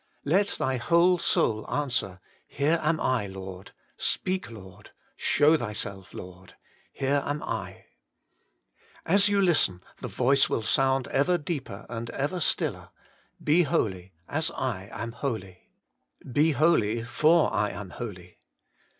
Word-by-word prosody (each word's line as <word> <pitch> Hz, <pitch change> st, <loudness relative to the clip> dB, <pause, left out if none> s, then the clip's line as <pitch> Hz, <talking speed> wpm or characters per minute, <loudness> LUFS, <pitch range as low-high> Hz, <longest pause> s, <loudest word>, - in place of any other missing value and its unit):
Let 190 Hz, +8 st, +3 dB
thy 130 Hz, -1 st, 0 dB
whole 170 Hz, +8 st, +3 dB
soul 110 Hz, -8 st, +1 dB
answer, 120 Hz, -10 st, -1 dB, 0.3 s
Here 155 Hz, +4 st, +1 dB
am 155 Hz, +1 st, +1 dB
I, 125 Hz, -6 st, 0 dB
Lord! 95 Hz, 0 st, -9 dB, 0.3 s
Speak, 185 Hz, -8 st, 0 dB
Lord! 100 Hz, -3 st, -12 dB, 0.3 s
Show 155 Hz, +2 st, +4 dB
Thyself, 100 Hz, -, -5 dB
Lord! 90 Hz, 0 st, -11 dB, 0.4 s
Here 140 Hz, +1 st, 0 dB
am 145 Hz, +1 st, -3 dB
I. -, -, -5 dB, 1.2 s
As 200 Hz, +4 st, +4 dB
you 200 Hz, -1 st, +2 dB
listen, 155 Hz, -, +3 dB, 0.2 s
the -, -, -5 dB
voice 135 Hz, +2 st, +2 dB
will 115 Hz, -, -1 dB
sound 135 Hz, +2 st, +2 dB
ever 160 Hz, +7 st, +2 dB
deeper 145 Hz, -, -5 dB
and 115 Hz, 0 st, -5 dB
ever 145 Hz, +7 st, -2 dB
stiller: -, -, -1 dB, 0.5 s
Be 160 Hz, +4 st, +4 dB
holy, 95 Hz, -, -1 dB, 0.2 s
as -, -, 0 dB
I 95 Hz, +2 st, -3 dB
am 115 Hz, +1 st, -5 dB
holy. 110 Hz, -8 st, -5 dB, 0.6 s
Be 150 Hz, +5 st, +3 dB
holy, 115 Hz, -8 st, +2 dB
for 155 Hz, +7 st, +3 dB
I 105 Hz, -, +1 dB
am 100 Hz, -3 st, -8 dB
holy. 90 Hz, -7 st, -8 dB
130 Hz, 130 wpm, -27 LUFS, 100-155 Hz, 1.2 s, Show